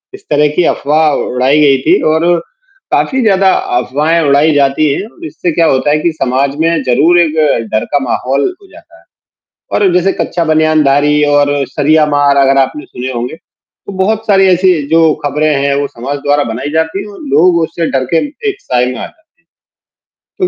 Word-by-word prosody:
इस - - -16
तरह 150 0 +3
की 180 - +3
अफवाह 155 +2 +1
उड़ाई 130 +4 +1
गई 140 -2 +4
थी - - +2
और 165 +2 0 0.7
काफ़ी 265 -1 0
ज़्यादा 195 -2 +3 0.3
अफवाहें 155 +6 0
उड़ाई 145 +1 +2
जाती 140 +1 +1
हैं 200 - -4
और 335 +8 -13
इससे 180 - -3
क्या 165 +1 +1
होता 135 +1 +1
है 150 - +2
कि 170 - 0
समाज 135 +2 0
में 165 -1 +1
ज़रूर 150 +8 +3
एक 160 -2 -1 0.4
डर 110 - -1
का 145 - +3
माहौल 135 +3 -1 0.2
हो 395 - -18
जाता - - -18
है। - - -25 0.7
और 195 -4 +2
जैसे 180 +2 +2
कच्चा 170 -1 -2
बनियानधारी 150 -2 +2
और 145 0 +2 0.2
सरिया 155 +3 +2
मार 145 -1 +1
अगर 135 0 +3
आपने 135 +2 -1
सुने 130 +1 -6
होंगे, 120 +5 -5
तो 180 +3 -16
बहुत 220 +3 -1
सारी 195 -2 +3
ऐसी 185 +1 +3 0.2
जो 160 -1 +3
खबरें 150 +2 0
हैं, 140 0 +1
वो 145 - -1
समाज 135 +5 -6
द्वारा 145 0 +2
बनाई 130 +5 -5
जाती 160 +5 -1
है 210 - -10
और - - -13
लोग 175 +1 +4
उससे 165 +1 -3
डर 130 -1 -1
के 165 - +3
म - - -11 0.2
एक 400 -1 -4
साये 125 -1 0
में 125 0 -4
आ - - -5
जाते - - -19 1.0
हैं। 370 - -5
150 Hz, 195 wpm, -12 LUFS, 140-170 Hz, 1.0 s, गई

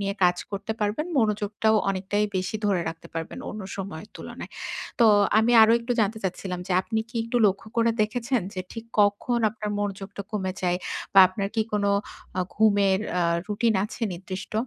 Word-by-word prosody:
নিয়ে 200 0 -1
কাজ 180 0 +4
করতে 205 +2 -3
পারবেন। 210 +10 0
মনোযোগটাও 215 0 +2
অনেকটাই 200 +2 0
বেশি 185 +4 -2
ধরে 195 -4 +2
রাখতে 165 0 -8
পারবেন 165 0 -5
অন্য 210 -1 -6
সময়ের 195 0 -6
তুলনায়। - - -8 0.5
তো 230 - +7 0.3
আমি 225 +2 +3
আরো 220 - +6
একটু 240 +1 -2
জানতে 220 +1 0
চাচ্ছিলাম 180 0 -3
যে, 190 - -2
আপনি 220 +3 -2
কি 235 - -8
একটু 230 +1 -2
লক্ষ্য 200 +3 -1
করে 230 0 +4
দেখেছেন 240 +3 0
যে, 185 - -3
ঠিক 225 -1 -7 0.2
কখন 205 +4 +2
আপনার 215 0 -5
মনোযোগটা 200 0 -4
কমে 190 -3 -1
যায়? 180 0 +1 0.4
বা - - +8
আপনার 195 +1 -3
কি 220 - +2
কোন 205 -1 +1 0.5
আ - - +3
ঘুমের 200 -3 +3 0.2
আ - - +3 0.2
routine 215 +1 +1
আছে 230 - -8
নির্দিষ্ট? 190 +2 -7
205 Hz, 175 wpm, -25 LUFS, 190-220 Hz, 0.5 s, বা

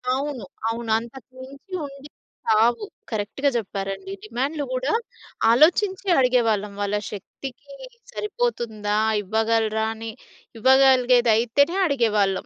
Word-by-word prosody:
అవును. 275 -6 -4 0.2
అవును. 230 0 -4
అంతకుమించి 260 - -12
ఉండేవి 280 +1 -11 0.4
కావు. 230 - +3 0.3
కరెక్ట్‌గా 220 +7 -1
చెప్పారండి. 195 -2 -5
డిమాండ్లు 270 +7 -2
గూడా 255 +3 -1 0.6
ఆలోచించే 375 - +3
అడిగేవాళ్ళం. 230 -5 +2
వాళ్ళ 205 +1 0
శక్తికి 270 +7 -9 0.4
సరిపోతుందా, 235 - -2 0.3
ఇవ్వగలరా 220 +1 +1
అని, 225 0 -6 0.5
ఇవ్వగలిగేదైతేనే 255 +2 +4
అడిగేవాళ్ళం. 215 - +1
240 Hz, 85 wpm, -23 LUFS, 220-275 Hz, 0.6 s, ఇవ్వగలిగేదైతేనే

